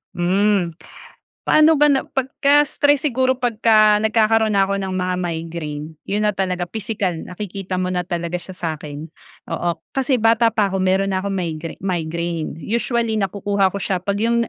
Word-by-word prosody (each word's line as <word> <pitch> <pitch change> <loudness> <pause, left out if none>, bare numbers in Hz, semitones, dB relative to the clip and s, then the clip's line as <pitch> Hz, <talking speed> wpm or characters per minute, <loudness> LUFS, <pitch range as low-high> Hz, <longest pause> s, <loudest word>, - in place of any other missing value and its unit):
Hmm, 185 0 +2 0.7
paano 310 +1 +5
ba 295 0 +5
na 270 - +2
pagka 280 +2 +2
stress 290 +1 +1
siguro 260 -1 +1
pagka 215 -3 +3
nagkakaroon 220 0 +2
na 195 -1 +4
ako 200 0 -2
ng 190 -1 -3
mga 185 0 -1
migraine, 160 -3 -4 0.2
'yun 210 +2 0
na 210 - +2
talaga 185 -2 -1
pisikal 205 -1 -3
nakikita 185 +2 -6
mo 180 0 -1
na 180 - 0
talaga 175 0 -3
siya 185 0 -10
sa'kin. 155 -3 -5 0.5
Oo, 175 - 0 0.2
kasi 270 -1 +1
bata 230 0 +4
pa 210 -3 +1
ako 190 - -1
meron 190 +1 +1
na 185 - 0
akong 200 0 -3
migra 165 -3 -4
migraine. 170 -2 -2
Usually, 230 0 0
nakukuha 200 0 +1
ko 200 - -5
siya 190 -1 -1
pag 200 +2 -2
'yung 235 +2 +1
195 Hz, 165 wpm, -20 LUFS, 180-225 Hz, 0.7 s, paano